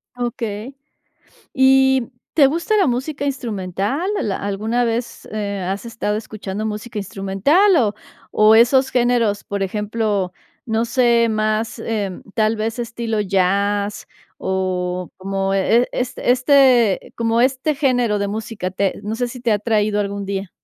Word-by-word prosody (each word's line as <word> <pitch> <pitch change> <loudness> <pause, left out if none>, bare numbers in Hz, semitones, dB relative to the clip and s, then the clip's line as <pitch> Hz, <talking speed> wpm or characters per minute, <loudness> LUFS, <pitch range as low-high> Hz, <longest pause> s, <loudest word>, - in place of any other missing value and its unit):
Okey. 235 0 -4 0.8
¿Y 265 -1 +4 0.2
te 285 -4 +6
gusta 340 +9 0
la 385 - +4
música 275 +3 -2
instrumental? 230 - -2
¿Al 205 - -1
alguna 215 +5 -1
vez, 235 +1 -3
eh, 205 -2 -3
has 195 +4 -3
estado 225 -3 -2
escuchando 215 -2 -5
música 215 +1 -5
instrumental, 205 - +2
o 220 -8 +2 0.4
o 215 +1 +5
esos 260 +3 +5
géneros, 240 -4 +1
por 200 -1 -3
ejemplo, 210 -1 -1 0.3
no 225 -1 0
sé, 235 -1 +3
más, 215 0 -1
em, 205 -5 -3
tal 220 -1 +2
vez 225 +2 -3
estilo 230 -2 -2
jazz, 200 +1 0 0.3
o 185 -1 -2
como 195 0 -2
e 210 +5 +3
e - - -3
este 250 0 -3
este 255 -5 +4
como 230 0 +1
este 265 +3 +1
género 245 -7 +1
de 200 - -1
música 210 -3 -4
te 195 +1 -1
no 215 +2 -3
sé 245 0 -1
si 250 +1 -9
te 235 -2 +1
ha - - +4
atraído 210 -1 0
algún 200 0 -3
día? 195 -1 -4
220 Hz, 145 wpm, -20 LUFS, 200-245 Hz, 0.8 s, te